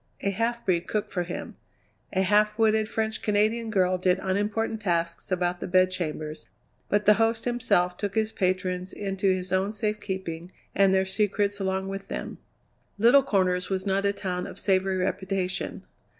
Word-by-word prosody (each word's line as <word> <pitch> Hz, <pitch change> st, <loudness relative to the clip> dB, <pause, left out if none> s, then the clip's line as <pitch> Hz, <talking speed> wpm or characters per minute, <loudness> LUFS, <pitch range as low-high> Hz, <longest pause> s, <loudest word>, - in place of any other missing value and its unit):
A 200 Hz, -, 0 dB
half 235 Hz, +4 st, -1 dB
breed 175 Hz, -2 st, +1 dB
cooked 210 Hz, -1 st, -2 dB
for 180 Hz, -, -1 dB
him; 175 Hz, 0 st, -6 dB, 0.5 s
a 190 Hz, 0 st, +1 dB
half 210 Hz, +2 st, +3 dB
witted 220 Hz, -1 st, +3 dB
French 220 Hz, -1 st, -2 dB
Canadian 215 Hz, +2 st, +1 dB
girl 185 Hz, -3 st, +2 dB
did 180 Hz, 0 st, +2 dB
unimportant 210 Hz, +3 st, -1 dB
tasks 170 Hz, -2 st, -1 dB
about 175 Hz, -1 st, 0 dB
the -, -, -4 dB
bedchambers, 175 Hz, -4 st, 0 dB, 0.4 s
but 205 Hz, 0 st, +1 dB
the 210 Hz, -, +8 dB
host 225 Hz, 0 st, +1 dB
himself 230 Hz, -8 st, +1 dB
took 200 Hz, -1 st, -3 dB
his 220 Hz, 0 st, +1 dB
patrons 185 Hz, -1 st, -1 dB
into 195 Hz, -1 st, -1 dB
his 185 Hz, 0 st, -2 dB
own 190 Hz, +2 st, +1 dB
safekeeping 190 Hz, -5 st, -3 dB, 0.2 s
and 195 Hz, 0 st, +4 dB
their 190 Hz, 0 st, +3 dB
secrets 205 Hz, +1 st, 0 dB
along 190 Hz, 0 st, -1 dB
with 195 Hz, 0 st, -6 dB
them. -, -, -5 dB, 0.6 s
Little 240 Hz, +7 st, +6 dB
Corners 185 Hz, -7 st, +1 dB
was 190 Hz, 0 st, -2 dB
not 195 Hz, 0 st, +1 dB
a 200 Hz, -, +3 dB
town 180 Hz, -3 st, -3 dB
of -, -, -10 dB
savoury 190 Hz, -1 st, +1 dB
reputation. 185 Hz, 0 st, -2 dB
195 Hz, 165 wpm, -26 LUFS, 185-210 Hz, 0.6 s, the